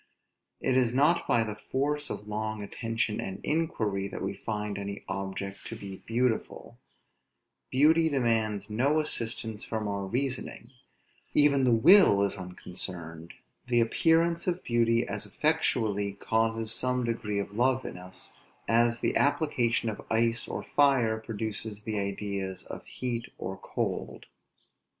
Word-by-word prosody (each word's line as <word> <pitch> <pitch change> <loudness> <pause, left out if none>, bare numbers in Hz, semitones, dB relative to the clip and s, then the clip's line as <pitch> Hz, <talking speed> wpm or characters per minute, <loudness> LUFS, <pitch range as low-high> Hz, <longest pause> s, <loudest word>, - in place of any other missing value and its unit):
It 130 - +1
is 125 -2 +3
not 150 +6 +3
by 115 -1 +4
the 110 -1 -4
force 145 +7 -2
of 105 - -6
long 110 0 -3
attention 115 0 -2
and 95 - -5
inquiry 110 -11 0
that 100 - -6
we - - -2
find 105 -1 -4
any 100 0 -5
object 95 0 -5
to 115 - -6
be 100 -3 -8
beautiful; 120 0 -1 0.9
beauty 160 +5 +4
demands 110 -7 0
no 130 +8 +2
assistance 115 -6 -3
from 110 -2 -3
our 100 -1 -2
reasoning; 125 +1 -3 0.6
even 140 -2 +5
the 125 - +4
will 115 - +7
is 100 - 0
unconcerned; 90 -3 -6 0.3
the 120 -1 +3
appearance 165 +8 +2
of 180 0 -1
beauty 115 0 +2
as - - -3
effectually 110 -10 +1
causes 115 +1 0
some 125 +1 0
degree 115 -3 -2
of 100 0 -3
love 130 +3 +2
in - - -5
us, 90 +1 -8 0.3
as 120 +1 +3
the - - +1
application 130 -6 +2
of 110 - -3
ice 115 +1 +1
or - - -4
fire 130 -6 +3
produces 110 -1 -4
the 110 -2 -2
ideas 100 -1 -3
of - - -8
heat 120 -2 -3
or 95 +1 -4
cold. - - -4
115 Hz, 140 wpm, -29 LUFS, 100-130 Hz, 0.9 s, will